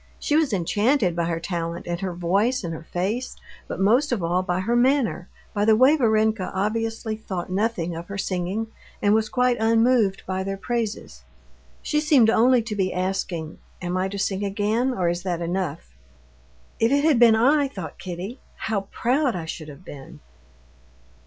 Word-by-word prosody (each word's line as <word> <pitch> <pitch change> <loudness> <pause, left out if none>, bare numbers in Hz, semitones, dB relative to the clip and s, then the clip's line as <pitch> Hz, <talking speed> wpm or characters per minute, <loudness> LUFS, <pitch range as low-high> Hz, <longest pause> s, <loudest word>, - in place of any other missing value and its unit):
She 295 - -1
was 310 -4 +3
enchanted 205 - +1
by 170 -1 0
her 165 -1 -2
talent, 170 -1 -4
and 175 0 -3
her 185 -2 -3
voice, 200 +9 +1
and 165 -1 -3
her 160 0 -9
face, 210 +8 -2 0.3
but - - -5
most 240 +9 +3
of 220 -8 -1
all 175 +2 +1
by 180 0 -1
her 230 +5 0
manner, 240 -7 +1 0.2
by 205 - 0
the 220 +1 +5
way 260 +7 +6
Varenka 220 -6 +1
obviously 225 +2 -1
thought 185 -5 -6
nothing 185 -4 -1
of 170 +1 -7
her 200 - -6
singing 190 +3 -2 0.3
and 205 0 +3
was 220 0 +1
quite 250 +1 +2
unmoved 225 -2 +3
by 190 0 -2
their 195 0 -3
praises. 230 0 -4 0.6
She 300 0 0
seemed 280 -8 +5
only 245 +1 +4
to 220 -2 -4
be 190 -2 0
asking: 180 -3 -3 0.2
"Am 180 0 -3
I 185 +1 0
to 200 +1 -6
sing 195 0 -1
again, 210 +6 0
or 185 -8 -1
is 175 +1 -1
that 175 -2 -2
enough?" 170 - -3 0.9
"If 225 +2 +3
it 285 +1 +3
had 305 -6 +4
been 230 -2 +7
I," 280 +5 +3
thought 185 - -8
Kitty, 185 +7 -6 0.2
"how 200 -3 -3
proud 260 0 +1
I 170 -2 -4
should 160 -1 -7
have 150 +4 -12
been! 140 -4 -11
205 Hz, 180 wpm, -24 LUFS, 180-235 Hz, 0.9 s, been